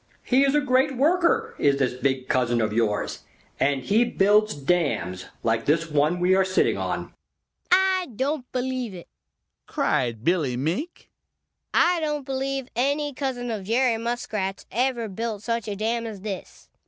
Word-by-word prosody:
He 260 +2 +3
is 275 +1 +2
a 295 - +4
great 265 0 +2
worker, 360 - +2
is 140 -1 +3
this 130 -3 +1
big 130 0 -1
cousin 120 -2 +1
of 110 -2 0
yours, 110 -2 0 0.4
and 135 -1 +1
he 215 - +3
builds 210 -1 +3
dams 140 - -1 0.2
like 115 0 +1
this 160 +2 +1
one 150 +4 +2
we 180 +1 +3
are 190 0 +4
sitting 185 0 +2
on." - - -3 0.6
"I 375 0 +4
don't 270 +2 -2
believe 255 -4 -2
it!" 175 - -10 0.6
cried 130 - 0
Billy 155 -7 +1
Mink. 175 - -3 0.6
"I 345 0 +3
don't 300 -3 -2
believe 270 -1 -2
any 285 +4 0
cousin 250 -3 -3
of 205 -4 -4
Jerry 235 +1 +2
Muskrat's 220 -5 -3
ever 240 0 0
built 215 +1 -4
such 230 -2 -2
a 205 - -3
dam 230 +3 -1
as 210 -4 -8
this. 200 -2 -7
220 Hz, 155 wpm, -25 LUFS, -, 0.6 s, a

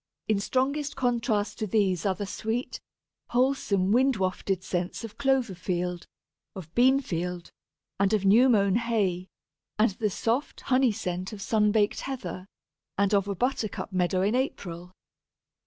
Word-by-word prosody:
In 215 -2 +2
strongest 275 +6 -1
contrast 230 -5 0
to 215 - -1
these 190 -3 +1
are 190 - +1
the 205 - -4
sweet, 225 +5 -3 0.5
wholesome, 240 -7 +1
wind 260 +3 +4
wafted 185 -1 -1
scents 180 +4 -3
of 225 +2 -9
clover 265 -6 +2
field, 180 0 -3 0.5
of 170 -4 -9
bean 260 +3 +5
field, 180 -5 -4 0.5
and 200 0 +3
of 210 -2 +1
new 230 +7 +6
mown 200 -3 +3
hay, 205 -6 0 0.5
and 215 +1 +3
the 210 +2 -1
soft 230 +8 -2
honey 255 -2 +3
scent 185 -2 -4
of 210 - -7
sun 210 +1 +2
baked 210 -1 +2
heather, 190 -8 -5 0.5
and 200 +1 +2
of 200 -1 +2
a 200 - -2
buttercup 220 -3 -2
meadow 185 0 +1
in 205 +3 +1
April. 180 -9 -3
205 Hz, 150 wpm, -27 LUFS, 185-245 Hz, 0.5 s, new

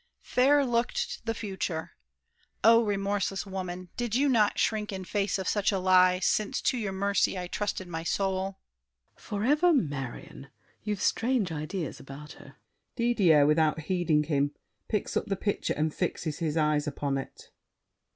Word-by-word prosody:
Fair 280 +3 +3
looked 235 -1 -1
the 225 - +1
future! 190 -6 -4 0.7
Oh, 230 +2 +7
remorseless 200 -1 -1
woman, 185 -2 -6
Did 240 -2 -2
you 280 +3 +3
not 215 -5 +3
shrink 215 -2 0
in 190 -1 -5
face 200 0 -1
of 190 -1 -4
such 205 -1 +1
a 195 - 0
lie, 185 -1 +5
Since 200 +3 0
to 255 - +1
your 205 -4 -2
mercy 200 0 +1
I 180 - -3
trusted 190 0 -3
my 165 -2 -4
soul? 190 +2 -1 0.6
SAVERNY. - - -19 0.3
Forever 340 +3 +4
Marion! 140 - -4 0.3
You've 210 0 -3
strange 230 -6 +1
ideas 160 +1 -4
About 140 +2 -10
her! - - -14 0.4
DIDIER 200 - +4
(without 155 +1 +2
heeding 165 -2 +1
him, 145 -1 0 0.3
picks 210 -3 -2
up - - 0
the 195 - 0
picture 205 +1 -1
and 155 0 0
fixes 160 -4 -3
his 160 -2 -1
eyes 150 -1 +1
upon 140 -1 -2
it). 135 - -10
190 Hz, 155 wpm, -28 LUFS, 160-210 Hz, 0.7 s, Oh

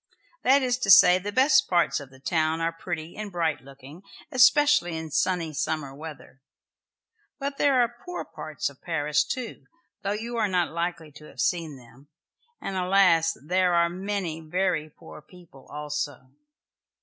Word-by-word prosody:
That 270 +2 +4
is 250 -1 0
to 220 - -2
say, 185 -1 +8
the 205 +2 -5
best 270 +3 +4
parts 175 -3 +2
of 140 -2 -11
the 130 0 -18
town 160 +2 0
are 165 0 0
pretty 165 -1 -6
and 210 -1 -6
bright 165 -4 -1
looking, 140 +4 -14 0.3
especially 260 - +4
in 160 -1 -7
sunny 175 -1 0
summer 145 -1 -3
weather. 145 -2 -11 1.0
But 280 -1 -5
there 275 -3 +3
are 240 0 -4
poor 360 0 -6
parts 155 -1 -5
of 140 -2 -10
Paris 150 -3 0
too, 250 -3 -6 0.3
though 200 0 -1
you 230 +3 -5
are 220 -2 +2
not 180 -3 0
likely 170 -2 -4
to 150 +2 -14
have - - -15
seen 165 -5 -1
them, 125 +3 -18 0.5
and 195 - -5
alas, 180 -3 +3
there 180 +1 +2
are 170 0 +3
many 185 -2 -4
very 160 -1 -1
poor 150 - -13
people 170 -4 -18
also! 145 -3 -5
170 Hz, 160 wpm, -26 LUFS, 150-195 Hz, 1.0 s, say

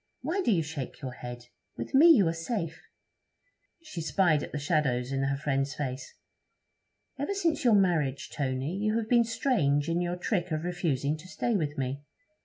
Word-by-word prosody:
Why 380 +4 -1
do - - +1
you 170 -5 +2
shake 145 -2 -6
your 130 - -3
head? 120 -1 -8 0.3
With 115 - -6
me 290 +5 +8
you 240 - +7
are 165 - +1
safe.' 165 +1 -4 1.0
She 180 - -6
spied 160 -2 +2
at - - -6
the - - -3
shadows 140 -5 0
in 135 0 0
her 135 0 0
friend's 135 -1 -1
face. 130 -3 -5 1.0
'Ever 290 +8 -1
since 330 -5 0
your 235 -4 +5
marriage, 160 -9 +1
Tony, 135 +3 -2
you 215 +2 0
have 225 -1 -2
been 235 0 +5
strange 170 - +1
in 170 +1 +1
your 175 0 -1
trick 180 0 -1
of 155 -1 -2
refusing 155 -5 -1
to 165 +4 -13
stay 235 +4 -1
with 155 -5 -1
me. 135 +1 -2
160 Hz, 185 wpm, -29 LUFS, 140-205 Hz, 1.0 s, me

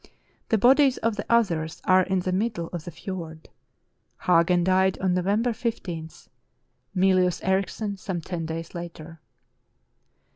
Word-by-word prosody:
The 220 - +3
bodies 265 +4 +5
of 230 -1 0
the 205 - -5
others 170 -9 +1
are 185 0 +5
in 185 0 0
the 185 - -2
mid 215 +5 0
dle 170 -3 -5
of 170 -3 -5
the - - -5
fiord. 165 -2 -8 0.7
Hagen 175 0 +3
died 190 +1 +2
on 185 -1 0
November 200 +7 +1
1 - - -3
5, 175 -9 -5 0.7
Mylius 185 -1 +3
Erichsen 195 +2 -1
some 185 -2 -3
ten 165 0 -5
days 165 +1 -6
later." 165 -2 -8
185 Hz, 145 wpm, -25 LUFS, 170-200 Hz, 0.7 s, bodies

